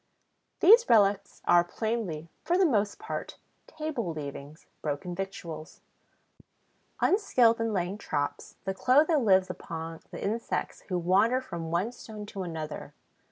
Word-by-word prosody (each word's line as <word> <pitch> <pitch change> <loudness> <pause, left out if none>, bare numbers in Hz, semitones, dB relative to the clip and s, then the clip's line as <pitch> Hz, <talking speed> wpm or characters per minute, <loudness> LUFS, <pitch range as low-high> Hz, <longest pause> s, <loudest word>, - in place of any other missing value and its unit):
These 460 +6 +7
relics 200 -2 +3
are 175 0 +6
plainly, 185 -5 -3 0.2
for 345 +2 +2
the 380 - +5
most 210 -9 +1
part, 440 - -6 0.3
table 305 - -3
leavings, 145 0 -8 0.2
broken 150 +4 -3
victuals. 175 -4 -6 1.2
Unskilled 245 - +4
in 225 0 0
laying 190 +1 -2
traps, 145 -7 -3
the 190 - -1
Clotho 290 - +4
lives 190 -6 +4
upon 165 -2 -7
the - - -8
insects 225 +4 -2
who 180 - 0
wander 195 +8 +3
from 170 -10 -6
one 180 +8 0
stone 215 -3 -9
to 200 -1 -6
another. 160 -4 -6
195 Hz, 130 wpm, -29 LUFS, 170-235 Hz, 1.2 s, These